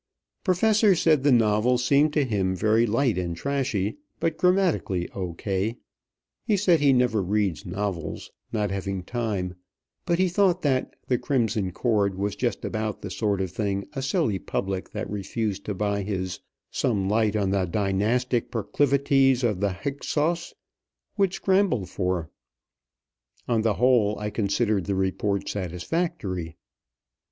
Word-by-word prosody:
Professor 205 +2 +4
said 155 -4 +3
the 145 +1 +3
novel 115 +1 +3
seemed 140 +5 +3
to 150 -2 +1
him 95 -5 0
very 110 +4 +3
light 115 -1 +1
and 85 -2 -3
trashy, 130 - -1 0.2
but 165 -1 0
grammatically 180 - +1
O. 90 -3 -4
K. 100 +6 -2 0.7
He 210 - +1
said 180 -4 +4
he 140 -1 +4
never 125 -4 +2
read 100 -2 0
novels, 90 -4 -4 0.2
not 105 -3 -1
having 95 -1 -3
time; 105 -5 -2 0.5
but 170 -2 +2
he 185 +1 +3
thought 180 0 +2
that 130 -3 0
"The 125 -2 +1
Crimson 110 -8 0
Cord" 100 -1 +1
was 100 +1 -1
just 120 -5 -2
about 110 -1 -3
the 100 - -5
sort 100 -2 0
of 95 -3 -3
thing 100 0 -2
a 135 - -3
silly 135 - 0
public 95 0 -3
that - - -4
refused 105 0 -3
to 105 - -3
buy 100 +1 0
his 95 -2 -3 0.3
"Some 100 -6 0
Light 110 +1 +2
on 100 -3 +1
the 95 -1 +1
Dynastic 110 +6 0
Proclivities 135 +3 +2
of 105 -6 +1
the 100 0 +1
Hyksos" 150 - -2 0.6
would 195 -3 +2
scramble 190 - +1
for. 90 -4 -2 1.2
On 115 -2 +2
the 110 -2 +1
whole, 115 -4 +3
I 105 0 -4
considered 100 -2 0
the 100 - 0
report 95 +1 -1
satisfactory. 95 - -3
110 Hz, 145 wpm, -25 LUFS, 95-135 Hz, 1.2 s, Professor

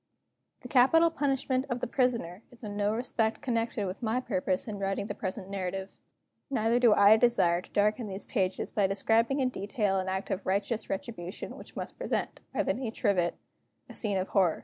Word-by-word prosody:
The 250 - -8
Capital 285 +7 +5
Punishment 270 -3 0
of 245 -1 -1
the - - -1
Prisoner 235 -8 0
is 240 -2 -14
in 205 -1 -5
no 205 0 +1
respect 225 -2 0
connected 230 -4 -1
with 185 +4 -5
my 235 +1 0
purpose 185 -5 -1
in 205 -2 -5
writing 195 +1 -1
the - - -4
present 190 0 -5
narrative. 190 0 -4 0.5
Neither 235 -2 +2
do 235 -4 +6
I 205 +2 +7
desire 200 -8 +3
to - - -17
darken 210 +3 +1
these 195 0 -6
pages 190 -5 -1
by 200 -2 +2
describing 225 +7 +2
in 255 - +2
detail 200 -3 -1
an 190 0 -2
act 190 +1 -3
of 190 0 -3
righteous 200 +4 -1
retribution 190 -2 -5
which - - -12
must - - -6
present, - - -2
by - - 0
the - - +1
nature 240 -3 -1
of 195 -3 +3
it, 170 0 0 0.5
a - - -9
scene 205 -3 -1
of 185 0 -2
horror. 185 -5 +2
210 Hz, 195 wpm, -29 LUFS, 195-245 Hz, 0.5 s, I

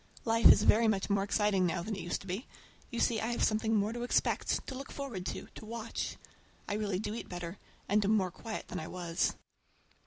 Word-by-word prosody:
Life 230 0 +6
is - - +5
very 225 +1 +5
much 200 -2 +1
more 200 -1 +3
exciting 200 -2 +2
now 170 0 -1
than 210 +3 -3
it 190 - -5
used 175 - -2
to - - -12
be. 190 +7 -4 0.4
You 235 - -4
see 225 -2 +2
I 225 - -1
have - - 0
something 220 +1 +2
more 210 +1 +1
to 240 - -4
expect, 245 - +1
to - - -6
look 270 +1 -7
forward 240 -10 -5
to, - - -4
to - - -10
watch. 230 +1 -4 0.5
I - - -1
really 205 -3 0
do 210 +2 -3
eat 230 - -6
better, 175 +1 -6 0.3
and 210 +1 +3
am 215 +2 +4
more 185 -3 0
quiet 220 +4 -6
than - - -3
I 160 - -5
was. 170 -2 -1
210 Hz, 225 wpm, -32 LUFS, 185-225 Hz, 0.5 s, Life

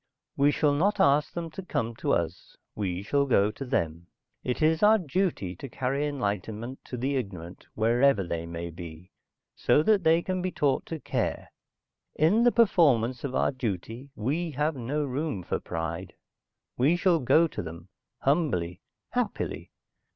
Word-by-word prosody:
"We 140 +1 +4
shall 145 0 +2
not 195 +9 +1
ask 145 +2 +4
them 170 -2 -4
to 190 - -6
come 115 -10 -2
to - - -1
us. 85 +1 -2 0.2
We 95 -3 -3
shall 140 +7 +1
go 105 -5 +3
to 135 - -7
them. 85 - -2 0.4
It 125 - -2
is 160 +1 +3
our 215 +1 +6
duty 170 - -1
to 135 - -8
carry 135 +4 -1
enlightenment 110 -1 -3
to 125 - -6
the 135 +4 -1
ignorant, 95 -8 -5
wherever 115 0 +3
they 85 -1 -4
may 85 0 -5
be, 85 +1 -10 0.4
so 150 - +3
that 205 0 +3
they 165 +1 +4
can 185 -1 -2
be 185 - -1
taught 140 -5 0
to 165 - -5
care. - - -2 0.7
In 185 +10 +4
the 245 - +6
performance 135 - +3
of 135 -2 -3
our - - +2
duty, 115 +1 -4
we 155 +10 -1
have 150 +3 0
no 135 +4 -2
room 135 - -3
for - - -2
pride. 80 0 -5 0.7
We 145 +7 +4
shall 175 -2 +3
go 155 +5 +4
to - - -5
them, 85 +2 -9 0.3
humbly, 135 - 0 0.3
happily." - - -2
130 Hz, 165 wpm, -27 LUFS, 100-155 Hz, 0.7 s, our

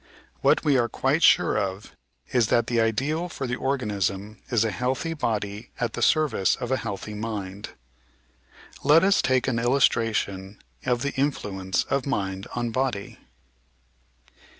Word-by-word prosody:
What - - +3
we 140 -3 +4
are 120 -1 +1
quite 135 +8 0
sure 105 - +5
of 95 0 -4 0.4
is 120 -4 +3
that 120 0 +2
the 115 -1 +1
ideal 140 +10 0
for 140 - -5
the 125 -1 -2
organism 105 -6 -2
is 115 -3 +2
a 110 - 0
healthy 130 - -2
body 110 -6 -3
at 120 - -1
the - - -4
service 145 - +3
of 120 - -5
a 130 - +2
healthy 105 -2 -5
mind. 105 -2 -5 1.1
Let 150 +4 +6
us 200 +1 +4
take 130 -1 +1
an 120 -3 0
illustration 115 -6 +1 0.3
of 125 0 +1
the 140 - -2
influence 100 -9 -1
of 140 0 -2
mind 95 -6 -2
on 120 -1 -1
body. 125 -5 -2
115 Hz, 150 wpm, -25 LUFS, 105-135 Hz, 1.1 s, Let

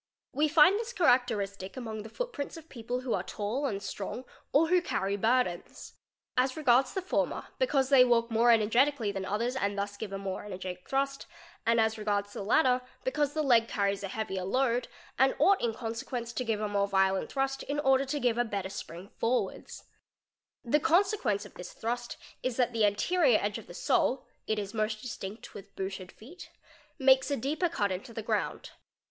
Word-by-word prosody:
We 300 +3 +2
find 325 +6 +6
this 470 +1 -5
characteristi 225 - +1
among 220 -4 -5
the 220 - -9
footprints 335 - -5
of 325 0 -13
people 245 +1 -4
who 255 -2 -2
are - - 0
tall 230 +7 -3
and 200 -5 -4
strong 225 +5 -5 0.3
or 320 +4 +4
who 360 0 +4
carr 200 - -1
burdens. 220 -4 -1 0.4
As 255 +2 +1
regards 260 -3 +3
the 380 - -2
former, 375 - -1
because 275 - +2
they 270 -3 +8
walk 235 -1 +2
more 230 +2 +4
energeticall 230 +1 +3
than 195 -1 -4
others 230 +6 -1
and 200 -5 -1
thus 200 0 -3
give 210 -2 -6
a 195 - -3
more 195 -1 -4
energetic 185 -2 -7
thrust; 275 0 -1 0.4
and 230 0 +4
as 220 0 +1
regards 205 -1 -1
tk - - -5
latter 255 0 +4 0.2
because 300 - 0
the 310 0 0
leg 235 -5 +4
carries 200 -2 0
a 200 - -3
heavier 190 -2 -3
load, 245 +4 +1 0.3
and 265 +1 +4
ought 395 0 +4
in 235 - +1
consequen 230 +1 -5
to 245 - -2
give 225 -3 -1
a 215 - -1
more 200 -1 +1
violent 190 -1 +1
thrust 270 0 -1
in 290 +1 -3
order 270 -1 +3
to 275 +2 -2
give 240 -3 +1
a - - +4
better 200 -5 -3
spring 185 0 -8
forward 245 +2 -1 1.0
The 290 +6 +3
consequence 335 - +2
of - - -13
this 180 - -9
thrust 240 +1 -4 0.2
is 255 -2 -2
that 245 -1 +1
the 225 -2 +3
anterior 355 - +3
edge - - -2
of - - -14
the - - -11
sole - - +1 0.2
(it 210 -1 -2
most 215 0 -2
distinet 215 -3 -7
with 200 0 -12
booted 190 -1 -5
feet) 310 +12 -13 0.5
makes 265 -1 +4
a 280 - 0
deeper 305 +8 0
cut 205 - 0
into 200 +6 -5
the 225 - -4
ground. - - -2
235 Hz, 190 wpm, -30 LUFS, 205-270 Hz, 1.0 s, they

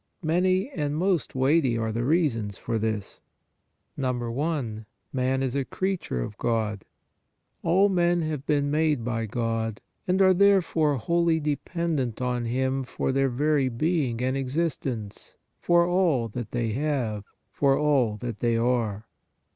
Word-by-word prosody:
Many 185 +5 +2
and 150 - -2
most 175 -5 0
weighty 130 -2 +3
are 110 -1 -1
the 115 +2 -2
reasons 120 - +1
for 115 -1 -2
this. 110 -2 -3 0.8
I. - - -6 1.1
MAN 130 0 0
Is 130 0 -2
A 140 - +1
CREATURE 185 - -2
OF 105 - -8
GOD. 110 -4 -1 0.8
All 185 +4 +4
men 175 -3 +2
have 155 -3 -3
been 145 -1 +1
made 150 -5 +1
by 115 -2 -2
God 115 -1 -2 0.3
and 185 +1 +2
are, 190 -1 +6
therefore, 175 -6 +3
wholly 170 +5 +1
de 150 -1 0
pendent 145 -5 -2
on 125 -1 -1
Him 130 +3 0
for 130 - -2
their 135 0 +2
very 140 +1 +1
being 130 -2 0
and 130 +1 0
existence, 135 -6 -3 0.2
for 175 0 +4
all 175 -10 +2
that 115 0 -5
they 120 -2 -1
have, 125 -5 -1 0.3
for 140 -1 +2
all 135 -8 +2
that 115 -1 -5
they 115 -1 +1
are. 115 -3 0
135 Hz, 145 wpm, -26 LUFS, 115-160 Hz, 1.1 s, are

